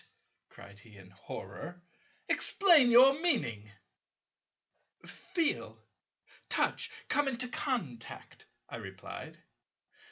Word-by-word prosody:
cried 100 Hz, 0 st, -14 dB
he 105 Hz, 0 st, -16 dB
in 95 Hz, -1 st, -15 dB
horror, 175 Hz, -, -9 dB, 0.4 s
"explain 335 Hz, -10 st, +5 dB
your 255 Hz, +3 st, +8 dB
meaning." 115 Hz, -, -1 dB, 1.3 s
"Feel, 335 Hz, -4 st, -3 dB, 0.7 s
touch, -, -, 0 dB, 0.2 s
come 290 Hz, -1 st, +1 dB
into 250 Hz, -1 st, -1 dB
contact," 225 Hz, -, -5 dB, 0.2 s
I -, -, -7 dB
replied. -, -, -10 dB
235 Hz, 85 wpm, -31 LUFS, -, 1.3 s, your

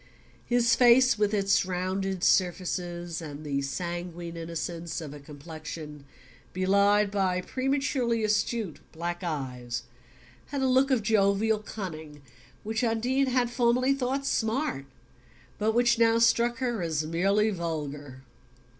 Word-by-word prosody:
His 235 Hz, -1 st, +3 dB
face, 250 Hz, 0 st, +5 dB
with 210 Hz, -1 st, +2 dB
its 200 Hz, -2 st, +2 dB
rounded 185 Hz, +1 st, -2 dB
surfaces, 175 Hz, -2 st, 0 dB
and 150 Hz, -1 st, -8 dB
the 140 Hz, -1 st, -1 dB
sanguine 175 Hz, +3 st, -5 dB
innocence 165 Hz, 0 st, -4 dB
of 150 Hz, -4 st, -7 dB
a 150 Hz, -, -9 dB
complexion 150 Hz, 0 st, -9 dB, 0.5 s
belied 200 Hz, +2 st, +3 dB
by 190 Hz, -3 st, +1 dB
prematurely 255 Hz, 0 st, 0 dB
astute 215 Hz, -3 st, 0 dB
black 175 Hz, +2 st, -4 dB
eyes, 125 Hz, -7 st, -4 dB, 0.6 s
had 280 Hz, -1 st, -3 dB
a -, -, +3 dB
look 260 Hz, +2 st, +3 dB
of 255 Hz, -5 st, +2 dB
jovial 210 Hz, 0 st, +2 dB
cunning 160 Hz, -9 st, -8 dB, 0.4 s
which 220 Hz, +2 st, -2 dB
Undine 245 Hz, +4 st, +1 dB
had 250 Hz, -1 st, +1 dB
formerly 245 Hz, +2 st, +2 dB
thought 275 Hz, +1 st, -2 dB
"smart" 220 Hz, -, -1 dB, 0.7 s
but 220 Hz, +1 st, +1 dB
which 240 Hz, 0 st, +3 dB
now 230 Hz, 0 st, +4 dB
struck 235 Hz, +1 st, +3 dB
her 240 Hz, -4 st, -2 dB
as 160 Hz, -2 st, -1 dB
merely 195 Hz, +7 st, +2 dB
vulgar. 150 Hz, -6 st, -5 dB
195 Hz, 125 wpm, -28 LUFS, 165-235 Hz, 0.7 s, face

